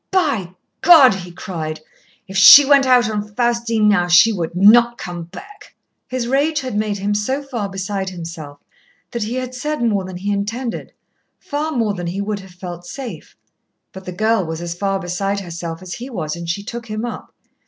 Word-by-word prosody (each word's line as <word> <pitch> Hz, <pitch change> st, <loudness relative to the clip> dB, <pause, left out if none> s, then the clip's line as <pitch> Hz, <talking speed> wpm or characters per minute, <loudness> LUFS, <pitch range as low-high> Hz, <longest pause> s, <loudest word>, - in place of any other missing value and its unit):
"By 270 Hz, -, 0 dB, 0.3 s
God!" 315 Hz, -, +8 dB
he 180 Hz, -2 st, -7 dB
cried, 160 Hz, -3 st, -6 dB, 0.5 s
"if 190 Hz, -, -10 dB
she 275 Hz, +8 st, +10 dB
went 275 Hz, -1 st, +4 dB
out 250 Hz, -2 st, +4 dB
on 215 Hz, -1 st, -2 dB
Faustine 235 Hz, -2 st, +1 dB
now, 200 Hz, -4 st, +3 dB
she 175 Hz, +6 st, +6 dB
would 170 Hz, -3 st, -4 dB
not 235 Hz, +5 st, +5 dB
come 175 Hz, -2 st, -7 dB
back!" 395 Hz, -, -13 dB, 0.3 s
His 250 Hz, -2 st, -3 dB
rage 290 Hz, +4 st, +1 dB
had 255 Hz, -5 st, -5 dB
made 210 Hz, -1 st, -1 dB
him 200 Hz, +1 st, -1 dB
so 260 Hz, +8 st, -1 dB
far 235 Hz, -7 st, -4 dB
beside 195 Hz, 0 st, -4 dB
himself 165 Hz, -5 st, -8 dB, 0.5 s
that 235 Hz, -, -4 dB
he 220 Hz, +4 st, -3 dB
had 255 Hz, 0 st, -4 dB
said 295 Hz, +2 st, -3 dB
more 205 Hz, -4 st, +1 dB
than 185 Hz, -1 st, -7 dB
he 200 Hz, +3 st, -3 dB
intended, 225 Hz, +5 st, -4 dB, 0.4 s
far 300 Hz, +2 st, -4 dB
more 230 Hz, -7 st, 0 dB
than 175 Hz, -3 st, -5 dB
he 180 Hz, +3 st, -4 dB
would 205 Hz, 0 st, -3 dB
have 190 Hz, -1 st, -13 dB
felt 175 Hz, -1 st, -9 dB
safe. 270 Hz, -4 st, -8 dB, 0.5 s
But 190 Hz, -1 st, -11 dB
the 180 Hz, -, -5 dB
girl 215 Hz, +2 st, +1 dB
was 160 Hz, -1 st, -5 dB
as 170 Hz, 0 st, -4 dB
far 195 Hz, +2 st, -2 dB
beside 195 Hz, +2 st, -2 dB
herself 170 Hz, -1 st, -7 dB
as 180 Hz, -1 st, -7 dB
he 250 Hz, +3 st, -7 dB
was, 160 Hz, -, -4 dB
and 170 Hz, 0 st, -7 dB
she 200 Hz, +4 st, -2 dB
took 235 Hz, +2 st, -7 dB
him 215 Hz, +2 st, -4 dB
up. 240 Hz, -, -7 dB
205 Hz, 195 wpm, -19 LUFS, 180-240 Hz, 0.5 s, she